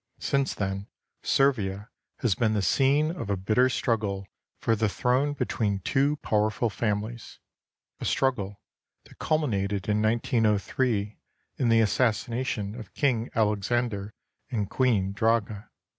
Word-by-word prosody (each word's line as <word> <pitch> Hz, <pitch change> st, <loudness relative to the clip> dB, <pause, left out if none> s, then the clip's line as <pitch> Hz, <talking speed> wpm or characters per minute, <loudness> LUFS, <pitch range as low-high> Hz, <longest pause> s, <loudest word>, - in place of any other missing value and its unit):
Since 140 Hz, -1 st, 0 dB
then 100 Hz, 0 st, -3 dB, 0.3 s
Servia 105 Hz, -5 st, +1 dB, 0.3 s
has 120 Hz, -6 st, +3 dB
been 110 Hz, +2 st, +1 dB
the 100 Hz, -, 0 dB
scene 140 Hz, -, +3 dB
of 170 Hz, -, -6 dB
a 100 Hz, -, +1 dB
bitter 110 Hz, +7 st, +3 dB
strug 120 Hz, -2 st, +1 dB
gle 100 Hz, -2 st, -3 dB, 0.3 s
for 115 Hz, -, +1 dB
the 110 Hz, -1 st, +1 dB
throne 130 Hz, +7 st, +1 dB
between 105 Hz, -7 st, -1 dB
two 140 Hz, +9 st, +2 dB
powerful 110 Hz, +2 st, +1 dB
families, 110 Hz, +2 st, -3 dB, 0.6 s
a -, -, -5 dB
struggle 105 Hz, -7 st, 0 dB, 0.4 s
that -, -, -19 dB
culminated 105 Hz, -11 st, 0 dB
in 105 Hz, 0 st, +2 dB
1903 110 Hz, -1 st, +1 dB, 0.4 s
in 125 Hz, -, +1 dB
the 115 Hz, 0 st, +5 dB
assassination 115 Hz, -1 st, 0 dB
of 110 Hz, -4 st, -10 dB
King 125 Hz, -5 st, +1 dB
Alex 105 Hz, -2 st, +1 dB
ander 110 Hz, -4 st, -1 dB, 0.3 s
and 105 Hz, -6 st, -2 dB
Queen 110 Hz, -7 st, +2 dB
Draga. 110 Hz, -1 st, 0 dB
110 Hz, 130 wpm, -27 LUFS, 100-125 Hz, 0.6 s, the